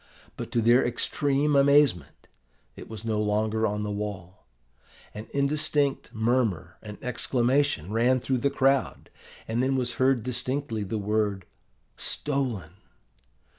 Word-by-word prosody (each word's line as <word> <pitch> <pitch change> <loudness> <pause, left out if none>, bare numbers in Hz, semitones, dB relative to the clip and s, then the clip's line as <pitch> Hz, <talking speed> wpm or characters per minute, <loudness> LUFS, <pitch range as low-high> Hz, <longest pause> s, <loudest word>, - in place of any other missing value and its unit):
But, - - -7
to 115 - +2
their 120 +3 +5
extreme 145 +4 0
amazement, 140 - +3 0.5
it - - -11
was 110 0 -8
no 110 -2 0
longer 110 +1 +1
on 105 +1 -2
the 105 - -3
wall. 100 -5 -6 0.7
An 105 +2 -8
indistinct 140 0 0
murmur 110 -7 0
and 105 -1 -9
exclamation 125 - 0
ran 125 +3 +3
through 130 +1 -1
the 140 - +1
crowd, 135 -2 0 0.4
and 115 +2 0
then 135 +1 +1
was 125 -2 -1
heard 130 -3 +3
distinctly 125 -1 -2
the 105 +3 -3
word, 105 -2 -1 0.5
"stolen." 125 - -2
120 Hz, 130 wpm, -26 LUFS, 105-135 Hz, 0.7 s, their